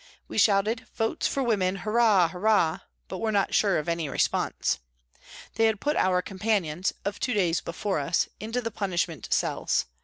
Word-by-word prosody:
We - - -2
shouted 210 +4 +2
" - - -36
Votes 225 -1 0
for 275 - -1
Women, 195 -6 +1
Hurrah! 210 -2 +3
Hurrah! 180 -2 +2
" - - -47
but - - -6
were 220 -1 0
not 200 -2 +1
sure 200 -3 +3
of 155 - -3
any 170 -3 -1
response. - - 0 0.8
They 225 - +4
had 220 -2 0
put 295 +5 0
our 180 -1 +2
com 190 - -9
panions, 190 -5 0
of 200 0 -3
two 250 - -1
days 175 -4 +1
before 180 +2 -2
us, 155 +5 +1
into 225 +3 -3
the 230 -1 -4
punishment 175 - -2
cells. - - +1
195 Hz, 185 wpm, -27 LUFS, 175-220 Hz, 0.8 s, They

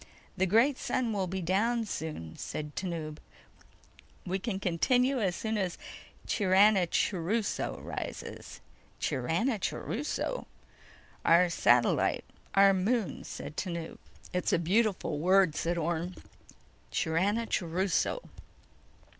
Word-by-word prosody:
"The 190 -1 +1
great 235 +8 +4
sun 240 -3 -1
will 195 -3 -1
be 190 +1 -3
down 225 +7 +1
soon," 150 - -5
said 150 -1 -6
Tanub. 165 -5 -4 1.1
"We 185 +2 -1
can 195 -1 -3
continue 250 +9 +2
as 185 -4 +1
soon 220 +2 -2
as 185 -3 -2 0.5
Chiranachuruso 195 0 +2
rises." - - -6 0.4
"Chiranachuruso?" 220 - -1 0.8
"Our 175 +2 +5
satellite... 120 -6 +3 0.3
our 195 0 +7
moon," 205 +3 0
said 145 - -7
Tanub. 170 -3 -4 0.3
"It's 180 - 0
a - - +4
beautiful 185 -3 +1
word," 185 0 +4
said 170 +1 -1
Orne. 170 +2 -2 0.8
"Chiranachuruso." 190 - 0
185 Hz, 95 wpm, -30 LUFS, 170-215 Hz, 1.1 s, our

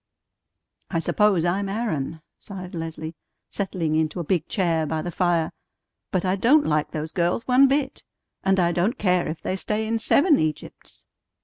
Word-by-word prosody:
"I 170 - -1
suppose 190 0 +2
I'm 195 +3 0
Aaron," 165 - -3 0.2
sighed 185 -3 -9
Leslie, 160 -1 -5 0.4
settling 180 -5 -2
into 160 +2 0
a - - -2
big 165 0 0
chair 165 -6 0
by 160 +1 -2
the 175 - -4
fire. 170 -2 +1 0.6
"But 185 -1 -1
I 185 +1 +2
don't 265 +10 +4
like 150 -1 +1
those 155 0 -5
girls 175 +5 0
one 260 +2 +6
bit! 275 0 -1 0.4
And 190 0 +2
I 170 -1 +3
don't 185 +9 0
care 180 -3 +1
if 155 +1 -5
they 185 - -1
stay 210 +3 -2
in 225 +1 -1
seven 290 - +4
Egypts." 155 -1 -5
180 Hz, 170 wpm, -24 LUFS, 160-210 Hz, 0.6 s, one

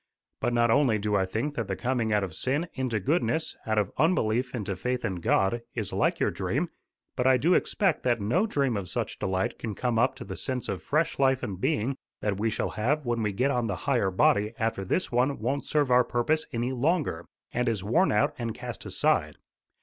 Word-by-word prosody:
But 120 - 0
not 120 -1 +3
only 130 -4 +4
do 105 0 -1
I 95 -1 +2
think 115 +10 -2
that - - -3
the - - -2
coming 120 -3 -1
out 105 -1 +2
of 95 -4 -4
sin 145 - -1
into 130 -4 -1
goodness, 160 - 0
out 110 0 +1
of 100 -2 +1
unbelief 125 -7 +1
into 100 -4 -3
faith 125 +6 -2
in 95 - -2
God, 95 +6 +1
is 110 -5 -3
like - - +1
your - - +2
dream; - - -1 0.5
but 125 - +1
I 130 -1 +6
do 165 +8 +3
expect 190 -4 +1
that 120 -2 +1
no 145 - +1
dream 140 - 0
of 95 -3 -5
such - - -3
delight 95 0 -1
can 110 -3 -4
come 120 0 0
up 130 +2 +2
to 135 - -8
the - - -6
sense 130 -2 -3
of - - -3
fresh 155 +1 0
life 135 -1 +3
and 95 -2 -4
being 130 +6 0 0.2
that 100 -2 -1
we 115 +2 +1
shall 110 - -1
have 140 +7 0
when 120 -1 0
we 105 -1 0
get 125 +8 +1
on 120 -3 0
the 100 - -1
higher 125 -8 +2
body 105 +4 +2
after 110 -3 -1
this 180 - -1
one 125 +3 +2
won't 140 +1 -2
serve 145 -4 +1
our 125 0 +6
purpose 125 +7 0
any 120 +2 -1
longer, 135 - 0 0.3
and 125 0 +1
is 105 -5 -2
worn 165 - +3
out 105 0 +2
and 115 -2 -3
cast - - -7
aside. - - +1
120 Hz, 220 wpm, -27 LUFS, 105-135 Hz, 0.5 s, I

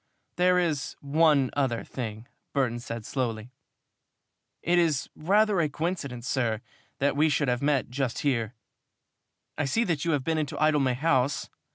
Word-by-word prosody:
"There 180 0 +4
is 160 -6 0
one 145 -2 +3
other 130 -5 0
thing," 115 -2 -6 0.3
Burton 125 -4 0
said 115 -2 -6
slowly. 120 -3 -3 1.1
"It 175 +1 +3
is 160 -5 +1
rather 205 +4 +3
a 155 - +1
coincidence, 140 -6 -3
sir, 120 -4 0 0.4
that 140 0 +1
we 155 +2 +3
should 145 0 +1
have 125 0 0
met 140 -4 +1
just 130 -2 -2
here. 120 -4 0 1.0
I 145 - +1
see 145 - +1
that 165 -9 -1
you 170 -1 +1
have 140 -3 0
been 160 +1 0
into 150 -2 -3
Idlemay 145 -4 +3
House. 135 -1 +1
140 Hz, 155 wpm, -27 LUFS, 125-160 Hz, 1.1 s, There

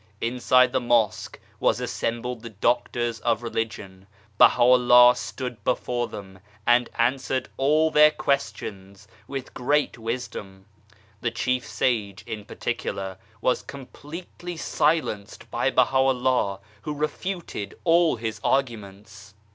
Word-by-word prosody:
Inside 125 +1 +3
the 130 - +1
Mosque 120 -3 +1 0.2
were - - +3
assembled 120 +1 -3
the 115 - -8
doctors 120 +2 0
of 115 0 0
Religion. 105 -5 -5 0.3
Baha 120 - +6
Vllah 125 0 +7
stood 125 -3 -6
before 125 -1 -1
them, 95 -2 -10 0.3
and 120 0 +4
answered 130 +2 0
all 155 +4 +2
their 150 0 +7
questions 105 -9 -3 0.2
with 135 -2 -6
great 145 0 0
wisdom. 110 -5 -6 0.6
The 120 - 0
chief 125 +1 -1
sage, 105 -6 -1
in 105 -2 -6
particular, 95 -1 -4 0.2
was 125 - +1
completely 165 +5 -9
silenced 150 -11 -1
by - - +1
Baha'u'llah, 130 -6 +2 0.2
who 150 +5 -4
refuted 155 - -4
all 170 -2 +4
his 110 -1 -5
arguments. 105 -5 -3
120 Hz, 115 wpm, -25 LUFS, 105-135 Hz, 0.6 s, Vllah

